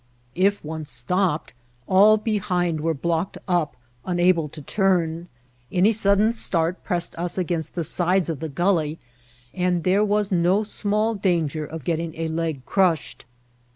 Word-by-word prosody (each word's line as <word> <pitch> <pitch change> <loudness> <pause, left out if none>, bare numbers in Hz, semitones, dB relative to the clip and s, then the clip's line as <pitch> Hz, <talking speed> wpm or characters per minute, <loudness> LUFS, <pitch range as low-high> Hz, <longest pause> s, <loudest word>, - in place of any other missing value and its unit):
If 195 -1 +1
one 160 0 -5
stopped, 155 +7 -1 0.3
all 205 - +6
behind 180 -7 -1
were 165 +1 0
blocked 170 +5 -2
up, 175 -7 0 0.3
unable 175 -3 +2
to 155 - -10
turn. 170 0 0 0.4
Any 185 +4 +4
sud 200 -2 +2
den 215 +3 +3
start 175 -5 -1
pressed 175 -3 -1
us 175 +1 -1
against 170 -4 -2
the 170 - -1
sides 180 +3 +2
of 160 -5 -3
the 160 - -4
gulley, 160 0 0 0.6
and 180 -2 0
there 195 +3 +3
was 210 0 0
no 180 +4 +2
small 215 +1 0
danger 165 -7 -1
of 160 0 -8
getting 165 0 -2
a 165 0 -3
leg 160 -5 -3
crushed. 180 -10 0
175 Hz, 150 wpm, -23 LUFS, 160-195 Hz, 0.6 s, all